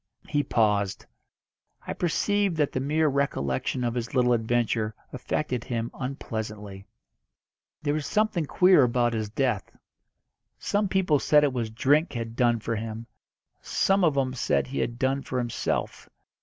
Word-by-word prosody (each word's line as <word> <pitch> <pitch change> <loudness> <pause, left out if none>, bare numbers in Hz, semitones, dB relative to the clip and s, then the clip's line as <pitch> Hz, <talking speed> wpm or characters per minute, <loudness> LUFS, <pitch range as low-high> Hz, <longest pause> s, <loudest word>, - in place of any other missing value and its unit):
He 145 - +1
paused. 105 -7 0 0.8
I - - -3
perceived 195 +1 0
that 150 -2 +1
the - - -2
mere 155 +4 +1
recollection 130 - -1
of 120 -1 0
his 120 +1 -4
little 125 -1 +4
adventure 115 -1 0 0.2
affected 125 -1 -2
him 115 -1 -3
unpleasantly. 110 -6 -6 1.0
"There 145 -1 +1
was 150 -2 -2
something 210 -7 +1
queer 180 -1 +5
about 120 -1 +2
his 110 -2 -2
death. 115 -3 -1 0.9
Some 205 0 0
people 185 -6 +2
said 150 +2 +4
it 140 -3 +2
was 120 -3 -2
drink 145 +9 +2
had 115 -2 -5
done 120 -1 +2
for 115 +1 -3
him, 110 +1 -5 0.6
some 195 0 +1
of 155 -5 +3
'em 130 -2 +1
said 130 - 0
he 135 - -4
had 120 0 -2
done 135 +2 0
for 130 - -4
himself. 120 -2 -2
125 Hz, 150 wpm, -26 LUFS, 115-150 Hz, 1.0 s, queer